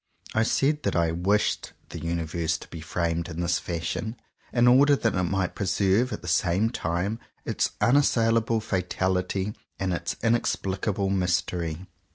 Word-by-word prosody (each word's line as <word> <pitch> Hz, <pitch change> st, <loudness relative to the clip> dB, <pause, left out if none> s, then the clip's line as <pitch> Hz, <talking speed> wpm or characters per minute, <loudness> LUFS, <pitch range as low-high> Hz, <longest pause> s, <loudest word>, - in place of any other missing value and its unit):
I 110 Hz, -, +2 dB
said 145 Hz, +6 st, +2 dB
that -, -, -1 dB
I 85 Hz, -1 st, +2 dB
"wished" 95 Hz, +5 st, 0 dB, 0.2 s
the -, -, -7 dB
Universe 85 Hz, -1 st, -1 dB
to -, -, -12 dB
be 80 Hz, -, -8 dB
framed 85 Hz, +1 st, -2 dB
in 85 Hz, 0 st, -6 dB
this 85 Hz, 0 st, +1 dB
fashion, 85 Hz, +6 st, -3 dB, 0.4 s
in 120 Hz, 0 st, +4 dB
order 140 Hz, +4 st, +6 dB
that 115 Hz, -4 st, 0 dB
it 90 Hz, -, 0 dB
might 95 Hz, 0 st, -1 dB
preserve 100 Hz, +5 st, +1 dB
at -, -, -5 dB
the -, -, -7 dB
same 90 Hz, +6 st, +2 dB
time 95 Hz, +2 st, -2 dB, 0.3 s
its -, -, 0 dB
unassailable 115 Hz, -4 st, +3 dB
fatality 95 Hz, 0 st, -1 dB, 0.2 s
and 95 Hz, -2 st, -1 dB
its 85 Hz, 0 st, -2 dB
in 115 Hz, 0 st, +4 dB
explicable 100 Hz, -3 st, -1 dB
mystery. 90 Hz, -2 st, -1 dB
95 Hz, 155 wpm, -26 LUFS, 85-110 Hz, 0.4 s, order